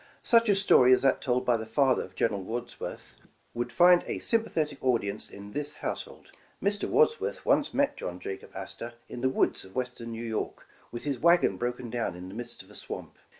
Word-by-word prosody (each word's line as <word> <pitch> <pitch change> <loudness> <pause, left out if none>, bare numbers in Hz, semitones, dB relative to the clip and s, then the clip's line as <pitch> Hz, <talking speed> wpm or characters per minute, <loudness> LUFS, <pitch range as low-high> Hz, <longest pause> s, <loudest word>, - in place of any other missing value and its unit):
Such 230 -1 +4
a 200 - +5
story 130 -10 +6
as 130 - +3
that 135 -1 +3
told 125 -1 0
by 120 -2 +3
the 110 - -5
father 130 +3 +3
of 95 - -10
General 105 -4 0
Wads 120 +5 -5
worth, - - -7 0.4
w^ould 120 +1 -2
find 175 +3 +6
a - - -2
sympathetic 160 -11 0
audience 110 -5 +1
in 100 +1 -10
this 150 +4 -3
household. - - -6 0.3
Mr. 200 +1 0
Wadsworth 465 0 +2
once 290 - +3
met 285 0 +1
John 90 0 -5
Jacob 95 - -7
Astor 120 0 -6
in 120 - -7
the 130 - +2
woods - - +1
of 95 - -15
Western 125 -2 -3
New 115 +1 -5
York, 110 -1 -4 0.3
with 120 - -5
his 140 -4 -1
wagon 170 - +4
broken 120 +2 -4
down 115 -7 -2
in 90 +1 -8
the - - -9
midst 120 -1 -7
of 95 - -19
a - - -13
swamp. - - -7
125 Hz, 205 wpm, -28 LUFS, 115-150 Hz, 0.4 s, story